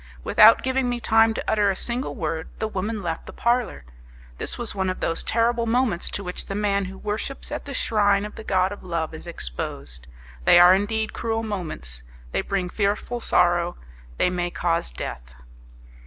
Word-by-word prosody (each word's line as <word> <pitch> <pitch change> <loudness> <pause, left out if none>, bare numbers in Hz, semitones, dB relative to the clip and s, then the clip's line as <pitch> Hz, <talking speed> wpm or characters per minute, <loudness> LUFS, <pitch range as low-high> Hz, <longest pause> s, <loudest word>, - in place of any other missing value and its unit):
Without 220 - +7
giving 260 -1 +1
me 245 0 -1
time 225 -1 +4
to - - -3
utter 210 -2 +3
a 195 - 0
single 240 +6 -3
word, 160 -5 -3
the 220 - -1
woman 210 +1 -3
left 165 -2 -4
the - - -7
parlour. 235 - 0 0.5
This - - -3
was 240 -2 -3
one 190 -2 -1
of 185 - -3
those 165 - -1
terrible 235 +1 +1
moments 225 -6 +1
to 200 - -4
which 180 -1 -5
the 195 - -4
man 200 -1 +1
who 190 +1 -8
worships 215 +9 -4
at 295 - -4
the 280 - -6
shrine 205 -3 +2
of 210 - -8
the 220 - -9
god 190 -2 +1
of 205 - -8
love 165 -3 -3
is 160 - -9
exposed! 60 - -5 0.4
They 175 - +7
are 175 +1 +9
indeed 220 +3 0
cruel 225 -1 -2
moments; 155 - -5 0.3
they - - 0
bring 195 -2 -2
fearful 210 +4 -1
sorrow, 175 -4 +2 0.4
they 180 - +2
may 175 -1 -1
cause 170 -1 0
death. - - -7
200 Hz, 185 wpm, -24 LUFS, 175-225 Hz, 0.5 s, are